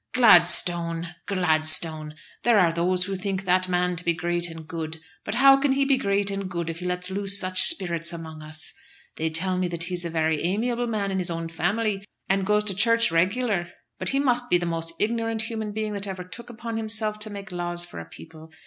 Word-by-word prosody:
"Gladstone! 175 -5 +4
Gladstone! 155 -4 +1 0.3
There 235 -2 +3
are 175 -4 +4
those 180 +2 0
who 195 +1 -4
think 195 0 -4
that 185 0 +2
man 180 0 0
to 170 - -4
be 170 -1 0
great 175 +1 -1
and 165 -1 -10
good; 160 -1 -6 0.2
but 200 - -3
how 270 +2 +7
can 275 0 +1
he 275 0 +1
be 275 0 +3
great 200 -3 0
and 195 -1 -4
good 170 -2 -3
if 165 - -9
he 180 - -5
lets 180 +1 -1
loose 200 +1 +2
such 185 0 +3
spirits 170 - +4
among 160 -2 -8
us? 155 +1 -2 0.4
They 160 0 -1
tell 180 +3 -1
me 185 - 0
that 170 -1 -3
he's 175 0 -1
a 170 - -3
very 160 -2 0
amiable 235 +7 -1
man 205 -3 -2
in 190 - -1
his 180 - +1
own 165 -1 -4
family, 195 +5 -1 0.2
and 195 0 0
goes 210 0 +2
to 210 -2 -2
church 230 +2 +2
regular; 185 +2 0 0.3
but - - -1
he 275 - +1
must 245 -3 +1
be 175 - +4
the 175 - -3
most 165 -1 -3
ignorant 225 0 0
human 220 -2 -4
being 215 0 -3
that 200 0 -2
ever 190 -2 -5
took 230 +7 -11
upon 230 -1 -6
himself 215 -1 -1
to 215 0 -3
make 200 -1 -9
laws 175 -1 -2
for 175 - -9
a 85 - -8
people. 160 - -13
185 Hz, 220 wpm, -24 LUFS, 170-215 Hz, 0.4 s, how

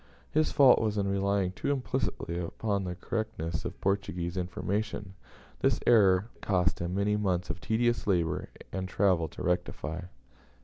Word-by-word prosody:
His 155 0 +2
fault 140 -3 +6
was 105 -2 0
in 100 -1 +1
relying 100 -1 +1
too 95 - -3
implicitly 125 -9 -2
upon 100 +3 -2
the 90 -1 -3
correctness 105 -7 -3
of - - -5
Portuguese 95 -3 -1
information. 100 +2 -3 0.5
This - - +2
error 100 -4 +5
it - - -26
cost 90 -3 +1
him 85 +1 -2
many 100 +1 +2
months 90 -4 0
of 85 +2 -8
tedious 120 0 +1
labour 85 -5 +1 0.2
and 95 -1 -3
travel 95 -5 +2
to - - -8
rectify. 90 -1 -2
95 Hz, 150 wpm, -30 LUFS, 90-105 Hz, 0.5 s, fault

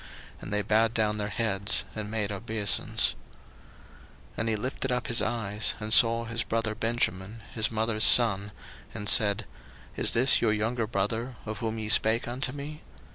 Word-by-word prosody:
And - - -8
they 105 0 0
bowed 110 +3 +2
down 105 -1 0
their 105 0 -3
heads, 105 -3 +1
and 110 -1 -5
made 105 -2 -2
obeisance. 100 0 0 1.2
01:043:029 - - -25
And 110 0 -1
he 110 - 0
lifted 130 +4 -4
up 125 - -1
his 115 0 +1
eyes, 105 -2 -1
and 110 0 -1
saw 115 0 +5
his 115 0 -2
brother 115 0 -2
Benjamin, 110 -2 -2
his 110 -2 0
mother's 110 0 -1
son, 105 -4 +4 0.4
and 105 - -6
said, 105 +1 +3 0.5
Is - - +2
this 130 +3 +4
your 110 -2 +2
younger 110 +2 -1
brother, 115 +4 -2
of 110 -1 -6
whom 115 -2 -3
ye 110 -1 -4
spake 110 +1 +2
unto 125 +2 -3
me? 145 +2 -8
110 Hz, 170 wpm, -27 LUFS, 105-115 Hz, 1.2 s, saw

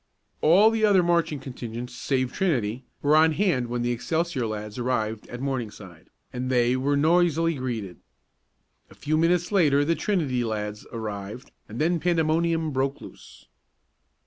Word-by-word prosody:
All 195 +8 +6
the 225 -1 -1
other 200 -4 +5
marching 170 -4 +1
contingents 125 -2 -7
save 130 -2 -1
Trinity 130 - -1 0.2
were 145 +1 +4
on 160 0 +5
hand 155 -9 +1
when 120 0 -2
the 120 - 0
Excelsior 160 +1 -1
lads 105 +1 -6
arrived 110 -3 -2
at 120 +1 -7
Morningside, 105 - -5 0.2
and 125 +1 -3
they 125 -1 +2
were 140 +2 +1
noisily 165 +1 +3
greeted. 120 - -4 0.9
A - - -16
few 155 +1 -1
minutes 175 +3 +2
later 145 -8 +3
the 165 - +2
Trinity 155 - -1
lads 105 -2 -4
arrived 105 0 -6 0.2
and 110 - -8
then 165 +2 +1
pandemonium 165 -1 +1
broke 135 +1 -1
loose. - - -14
135 Hz, 145 wpm, -25 LUFS, 120-165 Hz, 0.9 s, All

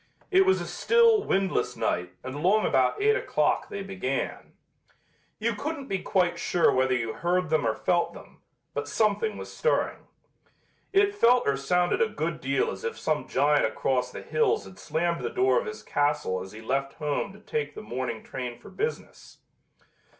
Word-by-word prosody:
It 380 0 +5
was 380 - +4
a - - -4
still, 460 -2 +4
windless 195 -1 0
night 90 0 -1
and 130 - -5
along 185 +9 +2
about - - +2
eight 430 +1 +4
o'clock - - 0
they 200 - -5
began. 190 -9 -4 0.8
You 230 +2 0
couldn't 280 +6 -4
be 195 -6 -2
quite 175 -2 +1
sure 175 0 +3
whether 130 0 +2
you 115 -2 -2
heard 175 -1 0
them 155 -7 +2
or 110 - +1
felt 175 -1 +1
them, - - -14 0.3
but - - -3
something 220 - +1
was - - -8
stirring. 480 - 0 0.8
It 400 +1 +4
felt 250 - +4
or 140 - +3
sounded 175 +6 +1
a 225 - +4
good 160 -3 -3
deal 140 +1 +1
as 95 - -8
if 115 0 -3
some 150 +6 -1
giant 145 0 +3
across 125 +3 0
the - - -8
hills 445 -1 +1
had 190 - -13
slammed 170 +2 -1
the - - -2
door 385 +5 +3
of - - -5
his 440 - -7
castle 145 -11 0
as 95 +1 -8
he 110 - -10
left 135 +4 -1
home 150 +6 -2
to 210 - -14
take 150 -8 -3
the - - -7
morning 120 0 -4
train 125 -2 -5
for - - -14
business. 450 +4 -5
170 Hz, 180 wpm, -27 LUFS, -, 0.8 s, It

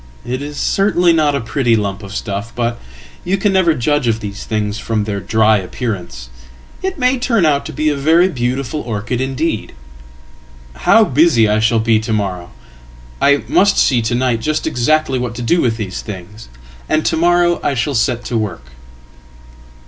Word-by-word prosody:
"It 130 +2 -3
iscertainly 175 +5 +1
not 150 -3 +2
a - - 0
pretty 115 +1 +1
lump 100 -1 -2
of 100 0 -9
stuff. 100 +3 -4
But 120 -1 -2 0.4
you 190 +2 0
can 195 0 +1
never 180 -4 +3
judge 145 +2 0
of 115 -1 +1
thesethings 105 0 -4
from 110 -1 -1
their 105 -1 -3
dry 110 +1 +2
appearance. 90 - -5 0.5
It 380 -1 -3
may 255 -1 +1
turn 230 -7 +2
out 145 -1 +1
to - - -6
be 155 +1 -2
a 145 - 0
very 160 +6 +3
beautifulorchid 125 - -3
indeed. 135 -2 -2 1.0
How 225 - +5
busy 145 - +3
I 105 +1 +2
shall 110 +1 +2
be 110 0 +2
to 110 +1 -4
morrow! 95 -4 -3 0.7
I 140 0 +3
must 200 +1 +3
see 125 -3 +3
to 115 +2 -1
night 125 -2 0
justexactly 155 -1 0
what 120 -1 -4
to 120 - -5
do 170 +8 +2
with 115 -2 0
these 95 -4 -5
things, 105 - -10 0.4
and 155 0 +1
to - - +1
morrow 175 +1 +2
I 140 - 0
shall 130 +4 -1
set 120 0 0
to 120 - -2
work."" 65 - -5
120 Hz, 170 wpm, -16 LUFS, 110-155 Hz, 1.0 s, How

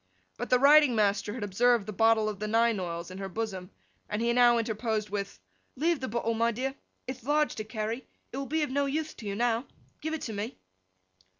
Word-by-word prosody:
But - - -5
the 250 - +5
riding 285 -1 +6
master 205 -1 +1
eye - - -6
had 245 - -4
observed 230 +2 +3
the 215 - -5
bottle 225 +1 +4
of 210 -2 -4
the 215 - -2
nine 225 0 +3
oils 170 -1 -4
in 185 - -8
her 195 -1 -4
bosom, 190 -3 -4 0.4
and 210 - -2
he 235 +1 +1
now 240 -1 +6
interposed 220 -2 -1
with 200 -1 -4 0.4
'Leave 325 +3 +1
the 260 - -3
bottle, 230 +1 -1
my 230 +1 +2
dear; 260 +4 -2 0.3
ith 260 0 -6
large 300 +3 +2
to 215 - -3
carry; 220 +3 -4 0.2
it 255 - -6
will 275 0 -3
be 310 +3 0
of 290 - -2
no 280 +1 +1
uthe 310 +3 -2
to 215 - -8
you 200 - -2
now. 235 +2 0 0.3
Give 315 +1 -2
it 320 - -6
to 225 - -4
me! 210 +4 -4
230 Hz, 225 wpm, -29 LUFS, 210-260 Hz, 0.4 s, riding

